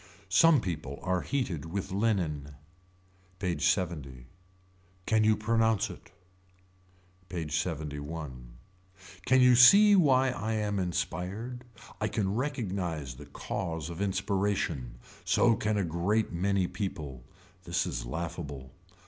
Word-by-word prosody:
Some 155 - +5
people 75 -7 -4
are 90 -1 0
heated 100 - -2
with 90 +4 -4
linen. 85 -9 -1 0.8
PAGE 85 -5 -2
LXX. 80 -9 -1 0.8
Can 110 -1 +3
you 110 0 +4
pronounce 110 -1 +1
it. - - -14 1.2
PAGE 80 -4 -4
LXXI. 80 -2 -3 1.0
Can 130 0 +5
you 125 0 +7
see 200 - +8
why 135 -7 +4
I 110 -2 -3
am 105 -2 -1
inspired. 90 +7 -3 0.3
I 110 - 0
can 100 -2 -1
recognise 95 - -3
the 75 0 -11
cause 80 +1 -4
of 85 +3 -6
inspiration. 95 - -1 0.3
So 115 -1 +3
can 110 0 -1
a 100 - +1
great 90 +7 0
many 95 +2 +1
people. 75 - -5 0.4
This 90 0 0
is - - -4
laughable. 70 -1 -6
95 Hz, 115 wpm, -29 LUFS, 80-110 Hz, 1.2 s, see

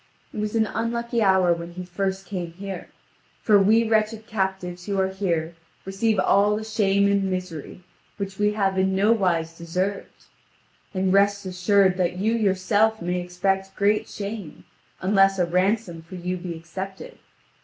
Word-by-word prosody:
It - - -5
was 210 +1 -2
an 220 -1 +3
unlucky 235 +1 -2
hour 190 -3 +4
when 170 0 -7
he 180 +1 -7
first 190 +2 -3
came 175 -3 -5
here, 195 +1 -7 0.6
for 210 -2 +5
we 220 +3 +4
wretched 220 0 +1
captives 190 -4 -3
who 200 -1 -1
are 190 0 +2
here 170 -4 -2 0.3
receive 200 +3 0
all 200 +2 +3
the 215 - -4
shame 200 -2 +2
and 200 -1 +2
misery 185 -2 -5 0.3
which 195 -1 -5
we 210 0 +2
have 195 -2 0
in 190 0 +2
no 205 +3 +3
wise 170 -7 +1
deserved. 185 +4 -4 0.7
And 185 0 +1
rest 200 0 +3
assured 185 +1 +2
that 180 -1 0
you 215 +4 +1
yourself 210 +1 +2
may 180 +1 -2
expect 195 +2 -1
great 210 +2 +1
shame, 200 -5 -7 0.4
unless 195 0 +4
a 180 - +2
ransom 185 0 0
for 165 +3 -11
you 180 +1 -3
be 175 -1 -6
accepted. 190 +4 -8
195 Hz, 160 wpm, -24 LUFS, 180-210 Hz, 0.7 s, for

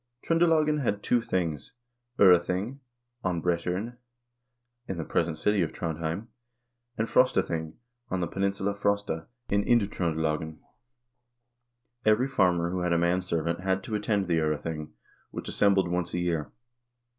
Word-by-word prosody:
Tr0ndelagen 160 -3 +3
had 105 -5 -1
two 120 - +2
things: 85 - -2 0.4
Prething, 95 +6 +4 0.4
on 90 -2 0
Brat0ren, 90 +7 -1 0.9
in 95 - -4
the 80 - -2
present 80 +1 0
city 105 +4 +2
of 80 - 0
Trondhjem, 85 +4 -3 0.7
and 110 - 0
Frosta 130 +2 +4
thing, 80 -2 -4 0.3
on 95 - -1
the 85 - 0
peninsula 100 +2 -1
Frosta, 100 -5 -1 0.2
in 100 0 +2
Indtr0ndelagen. 80 -8 0 1.5
Every 110 +4 +3
farmer 90 -9 +2
who 90 - -2
had 90 -1 +1
a - - +3
manservant 85 -1 0
had 95 +1 0
to 110 - -6
attend 105 -1 0
the 85 -2 +1
0rething, 75 0 -2 0.4
which - - -7
assembled 100 -2 +3
once 85 0 -2
a - - 0
year. 85 -4 -1
90 Hz, 135 wpm, -28 LUFS, 85-100 Hz, 1.5 s, Prething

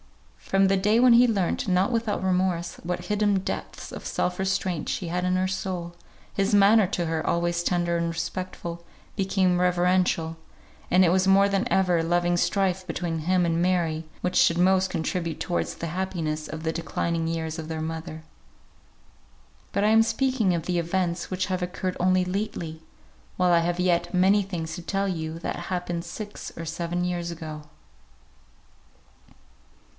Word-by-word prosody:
From 195 0 +2
the 195 - +3
day 210 +4 +3
when 250 -1 +7
he 245 +1 +7
learnt 195 -7 0
(not 185 +4 +2
without 225 -4 -1
remorse) 180 -2 0
what 180 +1 -3
hidden 210 -1 +1
depths 190 - -4
of - - -8
self 180 - -1
restraint 190 -3 -1
she 180 - -2
had 180 +2 -2
in 180 0 +1
her 185 0 +1
soul, 185 -2 -4 0.4
his 200 +2 +1
manner 205 0 +6
to 175 -2 -2
her, 160 -1 -2
always 170 0 0
tender 175 -1 +1
and 170 0 -1
respectful, 170 0 -5 0.3
became 190 -2 +1
reverential; 180 -2 +2 0.5
and 185 +1 +5
it - - +4
was 185 +1 +2
more 195 +1 +6
than 200 +4 -1
ever 180 -3 +3
a - - 0
loving 175 +1 +1
strife 190 0 +1
between 170 -3 -3
him 180 +3 +2
and 165 0 +1
Mary 170 -3 +1 0.2
which 180 - -1
should 170 - +4
most 190 +1 +3
contribute 165 0 -2
towards 175 - -2
the 170 - -5
happiness 160 -3 -3
of 160 +1 -7
the 160 0 -1
declining 165 0 -2
years 160 0 -3
of 160 - -6
their 160 -1 -3
mother. 160 0 -5 1.5
But 200 - 0
I - - +4
am 225 +1 +6
speaking 245 -5 +1
of 165 - -2
the 180 -1 0
events 170 0 -1
which 185 0 -1
have 185 -1 -2
occurred 180 +1 -3
only 185 0 +3
lately, 180 -4 -4 0.6
while 180 -1 +3
I 170 - +6
have 175 +1 -1
yet 175 -1 +1
many 195 +3 +4
things 175 -5 -4
to 175 - -7
tell 195 +3 -1
you 160 -3 -3
that - - -3
happened 175 -2 -3
six 205 +4 -7
or 165 - -5
seven 170 +2 -2
years 175 -1 -2
ago. 155 -2 -7
180 Hz, 170 wpm, -26 LUFS, 170-190 Hz, 1.5 s, when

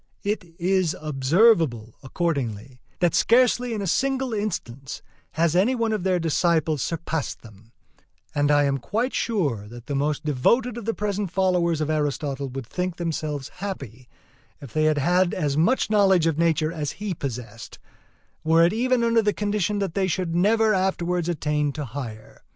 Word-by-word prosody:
It 200 -5 -3
is 185 -2 +1
observable, 150 - +2
accordingly, 130 - -3 0.2
that 175 -2 +3
scarcely 245 0 +3
in 205 - -3
a - - -2
single 265 +5 0
instance 155 - -4 0.3
has 165 0 +1
any 210 +9 +3
one 230 -2 0
of 210 - -1
their 185 0 +1
disciples 160 -2 +1
surpassed 165 -2 -3
them; 110 0 -16 0.6
and 145 0 +1
I 145 0 +4
am 140 -1 0
quite 230 - -2
sure 145 - -1
that 120 +2 -11
the 145 - -4
most 145 +2 -1
devoted 225 - +2
of 235 -3 -7
the 225 - -1
present 205 -2 -2
followers 180 -3 +1
of 155 0 0
Aristotle 145 -2 -2
would 130 0 -6
think 180 +7 -3
themselves 155 -5 -3
happy 135 - -7 0.5
if 135 -5 -11
they 155 0 +2
had 175 +4 +2
as 145 -2 -1
much 210 - +2
knowledge 190 -5 +4
of 165 -2 +1
nature 165 -1 +2
as 150 -4 -4
he 205 -1 -4
possessed, 120 -5 -7 0.7
were 165 +1 +5
it 175 - +1
even 245 +1 +1
under 230 0 +3
the 210 -1 +1
condition 210 -1 -1
that 195 -4 -2
they 195 0 +1
should 180 -2 -2
never 215 +4 +3
afterwards 180 -2 0
attain 150 -3 0
to 150 0 -4
higher. 115 -4 -8
165 Hz, 165 wpm, -24 LUFS, 145-200 Hz, 0.7 s, were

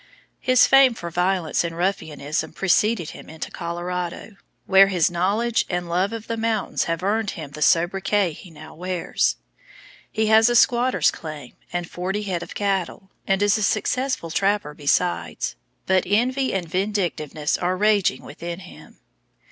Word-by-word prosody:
His 255 -1 +5
fame 270 -3 +6
for 170 -5 -7
violence 180 -1 0
and 165 -1 -4
ruffianism 160 -4 -2
preceded 195 0 +1
him - - -12
into 160 0 -7
Colorado, 175 +3 -5 0.3
where 195 0 +6
his 180 -4 +2
knowledge 210 +7 +1
of - - -8
and 175 -1 -2
love 185 +4 +1
of 225 -1 -6
the 230 - -3
mountains 225 -2 -1
have 165 +1 -2
earned 210 +1 0
him 150 -4 -7
the 150 - -9
sobriquet 185 +4 +2
he 175 +4 -12
now 155 -1 -12
bears. 180 +1 -1 0.8
He 220 0 0
has 220 +2 +5
a 240 - +1
squatter's 245 +2 +4
claim 155 -5 -9 0.2
and 175 -1 -3
forty 190 +5 -3
head 185 -4 -2
of - - -9
cattle, 195 -1 -2 0.2
and 195 +1 +2
is 205 +1 +3
a - - -3
successful 215 -2 0
trapper 195 -3 0
besides, 155 +4 -1 0.3
but 190 -1 +3
envy 255 +7 +1
and 185 -3 -2
vindictiveness 175 -5 -1
are 180 +1 0
raging 205 -8 +2
within 170 +4 -7
him. 180 - -14
185 Hz, 155 wpm, -23 LUFS, 170-210 Hz, 0.8 s, fame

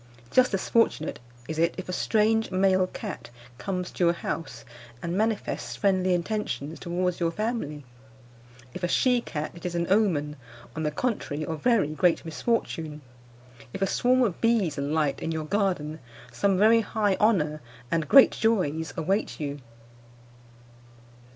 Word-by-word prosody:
Just 255 0 +4
as 190 - -3
fortunate 230 -9 +1 0.3
is 160 0 -4
it 170 +1 +2
if 185 - -6
a 180 - -4
strange 220 +3 +2
male 185 0 +3
cat 205 - -7 0.3
comes 180 -2 -3
to - - -2
your 170 0 +4
house 135 -8 -5 0.3
and 170 +6 -3
manifests 220 +1 -1
friendly 185 -2 +2
intentions 170 -5 -3
towards 180 0 -2
your 170 -1 +1
family. 165 - -3 0.9
If - - -7
a 175 - +1
she 250 +6 +3
cat, 150 -1 -4
it 170 - -13
is 175 -1 -3
an 170 0 0
omen, 165 -8 +2 0.4
on 160 - -3
the 155 - 0
contrary, 155 - -2
of 160 -1 -5
very 230 -11 +3
great 165 +2 +1
misfortune. 160 -4 -2 0.7
If 195 - -2
a - - +4
swarm 255 +5 +2
of 200 -8 -1
bees 225 -10 +2
alight 145 0 -1
in 165 - -2
your 160 -1 -3
garden, 175 -5 -1 0.3
some 195 -2 +1
very 225 +3 +5
high 210 -2 0
honour 155 -9 +2 0.3
and 165 -2 0
great 275 -1 +8
joys 160 -8 0
await 190 +6 -1
you. 145 -1 -4
180 Hz, 150 wpm, -26 LUFS, 155-210 Hz, 0.9 s, great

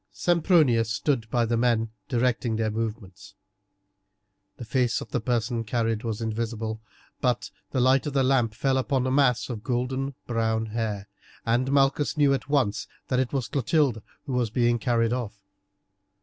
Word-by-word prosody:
Sempronius 155 - +3
stood 115 +1 -1
by 120 -2 +2
the 115 +1 0
men 115 -2 +1 0.2
directing 120 -1 +1
their 110 -1 0
movements. 110 -4 -5 1.2
The 120 - -7
face 125 0 +1
of - - -9
the 125 - -1
person 120 0 -1
carried 115 -1 -1
was 115 -1 -3
invisible, 110 0 -3 0.4
but 125 +4 0 0.2
the 130 - -1
light 130 +3 +3
of 145 - -3
the 135 -1 +3
lamp 125 -5 +2
fell 135 +2 +1
upon 130 -1 0
a 130 - 0
mass 130 -3 +3
of 115 -4 -6
golden 130 +2 -2
brown 115 -1 0
hair, 105 -3 -3 0.4
and 125 +3 +1
Malchus 140 +2 +2
knew 145 -2 +4
at 135 - -3
once 120 -8 +1 0.2
that 125 - +2
it 130 -2 0
was 135 -5 -1
Clotilde 135 -3 +1 0.2
who 135 - -4
was 125 -2 +1
being 120 +1 +2
carried 115 0 +1
off. 110 -5 -4
120 Hz, 165 wpm, -26 LUFS, 115-130 Hz, 1.2 s, knew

